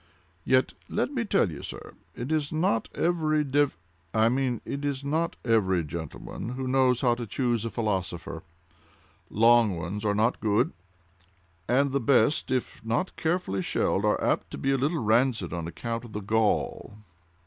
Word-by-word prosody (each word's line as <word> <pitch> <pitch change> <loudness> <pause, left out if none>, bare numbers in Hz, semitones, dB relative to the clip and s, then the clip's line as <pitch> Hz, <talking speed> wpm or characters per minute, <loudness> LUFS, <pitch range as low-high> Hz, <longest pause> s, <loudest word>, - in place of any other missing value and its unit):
Yet, 130 +5 +2 0.2
let - - -1
me 250 -5 -1
tell 195 - +2
you, 75 - -8
sir, - - -8 0.2
it 125 +5 -5
is 155 -2 0
not 155 -8 +1
every 155 -3 +1
dev—I 110 - 0
mean 125 -2 0
it 140 +1 -4
is 140 -1 -2
not 160 +4 0
every 95 -7 +2
gentleman 80 - -6
who 130 0 -3
knows 130 -1 +3
how 125 -3 +4
to 120 -1 -5
choose 120 0 0
a - - -1
philosopher. 95 -6 -3 0.9
Long 115 -3 +4
ones 95 +6 -4
are 105 -1 +1
not 115 +4 +1
good; 110 +7 +1 1.0
and 135 +2 +3
the 140 - +1
best, 140 +4 +3
if 130 -3 -2
not 120 +12 -1
carefully 160 - -1
shelled, - - 0
are - - +2
apt - - 0
to - - -7
be 135 - 0
a - - +3
little 150 +6 +1
rancid 110 -5 +2
on 85 -2 -3
account 115 +6 -4
of 115 -3 -11
the 105 - -3
gall!" 110 0 0
120 Hz, 165 wpm, -27 LUFS, 105-140 Hz, 1.0 s, how